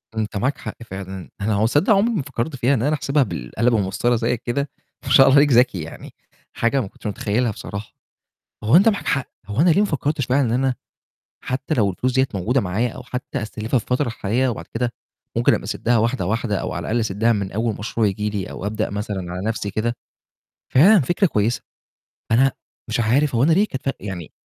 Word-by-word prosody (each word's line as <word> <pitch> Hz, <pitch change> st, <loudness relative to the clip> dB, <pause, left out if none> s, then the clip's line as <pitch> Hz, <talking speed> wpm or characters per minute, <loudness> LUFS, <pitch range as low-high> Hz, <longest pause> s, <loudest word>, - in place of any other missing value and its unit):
أنت 105 Hz, -2 st, -2 dB
معاك 130 Hz, +8 st, 0 dB
حق 110 Hz, -, -6 dB
فعلًا، 95 Hz, -3 st, -7 dB
أنا 105 Hz, +1 st, +1 dB
هو 105 Hz, +2 st, +2 dB
تصدق 145 Hz, -, +3 dB
عُمري 220 Hz, +4 st, +3 dB
ما 165 Hz, -, 0 dB
فكّرت 135 Hz, +1 st, -4 dB
فيها 130 Hz, +2 st, +2 dB
إن 115 Hz, -, +1 dB
أنا 150 Hz, +4 st, +2 dB
أحسبها 145 Hz, -1 st, +1 dB
بالقلم 100 Hz, -, -1 dB
والمَسطرة 105 Hz, +4 st, +1 dB
زي 120 Hz, +1 st, 0 dB
كده 140 Hz, +5 st, -2 dB, 0.4 s
ما -, -, -4 dB
شاء 135 Hz, -, +8 dB
الله 135 Hz, -, +5 dB
عليك 145 Hz, 0 st, +5 dB
ذَكي 120 Hz, -7 st, +4 dB
يعني، 80 Hz, -, -9 dB, 0.4 s
حاجة 130 Hz, +3 st, +1 dB
ما 100 Hz, -, -4 dB
كنتش 105 Hz, -, -9 dB
متخيّلها 110 Hz, +3 st, 0 dB
بصراحة، 100 Hz, +1 st, -7 dB, 0.7 s
هو 115 Hz, +10 st, +5 dB
أنت 200 Hz, +5 st, +6 dB
معاك 205 Hz, -3 st, 0 dB
حق. 135 Hz, -2 st, 0 dB, 0.2 s
هو 105 Hz, +6 st, -1 dB
أنا 175 Hz, +1 st, +5 dB
ليه 180 Hz, -, +4 dB
ما 210 Hz, -, +3 dB
فكّرتش 150 Hz, -, -1 dB
بقى 130 Hz, +3 st, +2 dB
إن 125 Hz, -, +1 dB
أنا 130 Hz, +1 st, +1 dB, 0.7 s
حتى 130 Hz, +4 st, -2 dB
لو 105 Hz, -7 st, +2 dB
الفلوس 125 Hz, +7 st, -1 dB
دِيّة 130 Hz, +1 st, +3 dB
موجودة 110 Hz, +8 st, +1 dB
معايا 105 Hz, +6 st, 0 dB
أو 120 Hz, -, -9 dB
حتى 125 Hz, +1 st, -5 dB
أستلفها 110 Hz, +3 st, -2 dB
في -, -, -11 dB
الفترة 125 Hz, +1 st, +2 dB
الحالية 115 Hz, +3 st, 0 dB
وبعد 115 Hz, -, -5 dB
كده 120 Hz, +1 st, -1 dB, 0.4 s
ممكن -, -, +4 dB
أبقى -, -, -1 dB
أسدّها 120 Hz, 0 st, +1 dB
واحدة، 115 Hz, -2 st, 0 dB
واحدة 105 Hz, 0 st, -1 dB
أو -, -, -3 dB
على -, -, -3 dB
الأقل 120 Hz, +2 st, -1 dB
أسدّها 110 Hz, +2 st, +1 dB
من 100 Hz, -3 st, -2 dB
أول 110 Hz, +1 st, -1 dB
مشروع 110 Hz, +1 st, 0 dB
ييجي 105 Hz, +2 st, -1 dB
لي 100 Hz, -3 st, -4 dB
أو 100 Hz, -, -6 dB
أبدأ 110 Hz, +1 st, -1 dB
مثلًا 100 Hz, -4 st, -4 dB
على 90 Hz, -, -4 dB
نَفْسي 110 Hz, -2 st, -2 dB
كده، 115 Hz, +4 st, -1 dB, 0.8 s
فعلًا 190 Hz, +10 st, +7 dB
فكرة 175 Hz, -, +2 dB
كويسة. 110 Hz, -4 st, 0 dB, 0.7 s
أنا 135 Hz, +3 st, +4 dB, 0.4 s
مش -, -, 0 dB
عارف، 130 Hz, +5 st, +2 dB
هو 115 Hz, -, +3 dB
أنا 160 Hz, +4 st, +4 dB
ليه 200 Hz, +6 st, +4 dB
كانت 130 Hz, -9 st, -6 dB
فَرق 135 Hz, -, -1 dB
يعني 90 Hz, -5 st, -6 dB
120 Hz, 215 wpm, -21 LUFS, 105-135 Hz, 0.8 s, شاء